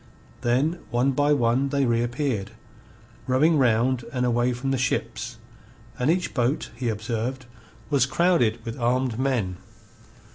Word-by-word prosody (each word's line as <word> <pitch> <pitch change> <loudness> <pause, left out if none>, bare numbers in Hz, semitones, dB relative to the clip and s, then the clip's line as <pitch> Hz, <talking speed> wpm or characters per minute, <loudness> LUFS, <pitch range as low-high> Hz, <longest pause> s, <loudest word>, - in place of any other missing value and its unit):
Then 135 +8 +1
one 125 +4 +2
by 145 +2 +2
one 130 0 +2
they 140 -1 +1
reappeared, 120 -2 -1 0.7
rowing 150 +5 +3
round 125 0 +2
and 125 -2 0
away 120 +1 +2
from 125 +2 -2
the 135 - +1
ships, 125 - -2 0.6
and 125 - +1
each 180 +2 0
boat, 125 +2 0
he 120 0 -2
observed, 115 +4 -3 0.5
was 135 -3 +3
crowded 145 -7 +2
with 115 +1 -5
armed 125 0 0
men. 120 -9 0
125 Hz, 135 wpm, -25 LUFS, 120-135 Hz, 0.7 s, rowing